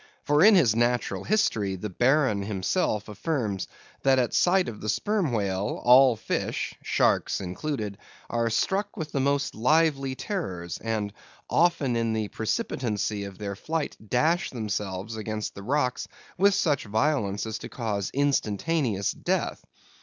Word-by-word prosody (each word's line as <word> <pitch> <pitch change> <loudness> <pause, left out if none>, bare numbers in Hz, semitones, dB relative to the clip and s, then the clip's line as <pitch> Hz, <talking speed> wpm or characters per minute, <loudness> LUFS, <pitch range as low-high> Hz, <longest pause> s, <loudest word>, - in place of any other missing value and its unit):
For 145 +2 +3
in 215 +1 +8
his 120 - +4
Natural 120 +1 0
History, 110 - +1
the 100 +2 -5
Baron 130 - +2
himself 105 - -1
affirms 105 - -2 0.3
that 135 -1 +4
at 125 -2 +1
sight 185 +1 +3
of 110 - -7
the 105 - -3
Sperm 205 - 0
Whale, 100 -2 -1
all 125 0 +7
fish 110 - -2
(sharks - - +1
included) 105 +2 -4 0.3
are 115 -1 0
"struck 195 - 0
with 155 -4 -5
the 140 - -1
most 140 +1 +1
lively 135 +1 +2
terrors," 95 - -4
and 110 -3 -2 0.4
"often 155 -7 +2
in 115 -1 0
the 110 -2 -2
precipitancy 110 -2 -2
of 100 -2 -9
their 100 -1 -4
flight 155 +8 -3
dash 160 +8 +2
themselves 105 -2 -4
against 110 0 -4
the 100 - -9
rocks 125 +3 -1 0.3
with 200 +2 +4
such 145 -7 +1
violence 110 -2 0
as 110 0 -4
to - - -8
cause 105 -6 -2
instantaneous 135 - 0
death." - - -2
120 Hz, 145 wpm, -26 LUFS, 105-150 Hz, 0.4 s, in